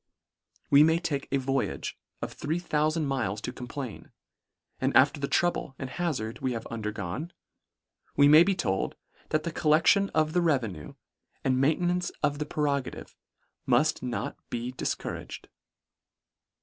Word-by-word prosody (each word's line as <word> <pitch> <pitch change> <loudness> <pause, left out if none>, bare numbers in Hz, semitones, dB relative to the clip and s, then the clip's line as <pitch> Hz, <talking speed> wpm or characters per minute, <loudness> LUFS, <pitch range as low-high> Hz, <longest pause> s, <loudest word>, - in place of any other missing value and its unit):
We 140 0 +8
may 160 +2 +5
take 145 -5 -2
a 140 - +3
voyage 135 0 -2 0.3
of - - -4
three 160 +4 -2
thoufand 155 -1 0
miles 120 -8 -1
to 125 - -4
complain; 125 -1 -7 0.7
and - - +3
after - - +5
the 140 - -1
trouble 175 -5 0
and 130 -2 -6
ha 175 +7 -1
zard 115 -7 -4
we 130 -1 0
have 115 - -5
undergone, 105 - -4 0.8
we 145 0 +6
may 155 +2 +9
be 195 +2 +3
told, 95 - -1 0.3
that 155 0 +1
the 170 - -3
collection 165 +6 +4
of 155 0 +2
the 180 - +3
revenue 120 - -1 0.5
and 130 -1 +2
main 150 +5 +2
tenance 175 0 +1
of 145 0 +1
the 150 - -3
prerogative, 140 -4 -2 0.5
muSt 155 +1 +3
not 125 -2 -3
be 120 +1 -3
dis 130 - -2
couraged. - - -7
145 Hz, 150 wpm, -28 LUFS, 125-160 Hz, 0.8 s, may